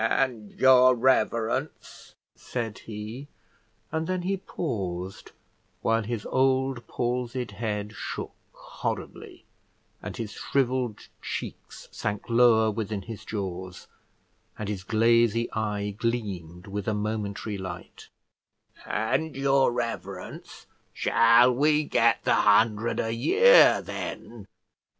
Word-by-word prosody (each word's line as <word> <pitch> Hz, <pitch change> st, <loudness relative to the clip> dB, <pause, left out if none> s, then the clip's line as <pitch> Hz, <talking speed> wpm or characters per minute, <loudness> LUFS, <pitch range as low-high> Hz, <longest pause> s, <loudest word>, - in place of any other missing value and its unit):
"And 115 Hz, -3 st, 0 dB
your 130 Hz, -1 st, +6 dB
reverence," 125 Hz, +2 st, -1 dB, 0.2 s
said 115 Hz, -4 st, -5 dB
he, 110 Hz, +5 st, -8 dB, 0.6 s
and 160 Hz, 0 st, -2 dB
then 185 Hz, -1 st, -2 dB
he 195 Hz, +2 st, 0 dB
paused, 95 Hz, -, -5 dB, 0.5 s
while 115 Hz, 0 st, +2 dB
his 110 Hz, -1 st, -4 dB
old 130 Hz, -1 st, +1 dB
palsied 125 Hz, -1 st, -2 dB
head 105 Hz, 0 st, -4 dB
shook -, -, -6 dB, 0.2 s
horribly, -, -, -6 dB, 0.6 s
and -, -, -7 dB
his 110 Hz, -3 st, -5 dB
shrivelled 130 Hz, -4 st, -1 dB
cheeks -, -, -7 dB
sank 105 Hz, 0 st, -4 dB
lower 115 Hz, -2 st, +5 dB
within 105 Hz, -2 st, -4 dB
his 110 Hz, +1 st, -8 dB
jaws, 95 Hz, -3 st, -5 dB, 0.7 s
and 105 Hz, -1 st, -4 dB
his 100 Hz, -3 st, -4 dB
glazy 115 Hz, +2 st, +2 dB
eye 105 Hz, -2 st, -2 dB
gleamed 100 Hz, -6 st, -4 dB
with 100 Hz, 0 st, -5 dB
a 110 Hz, -, +1 dB
momentary 105 Hz, -1 st, -3 dB
light; 90 Hz, -2 st, -8 dB, 0.8 s
"and 130 Hz, +8 st, -1 dB
your 135 Hz, -1 st, +3 dB
reverence, 115 Hz, -6 st, -6 dB, 0.3 s
shall 115 Hz, +2 st, +5 dB
we 150 Hz, +4 st, +3 dB
get 115 Hz, -5 st, +2 dB
the -, -, +3 dB
hundred 110 Hz, +2 st, +3 dB
a 115 Hz, 0 st, -1 dB
year, 455 Hz, -, +6 dB
then?" -, -, -7 dB
115 Hz, 110 wpm, -26 LUFS, 105-130 Hz, 0.8 s, your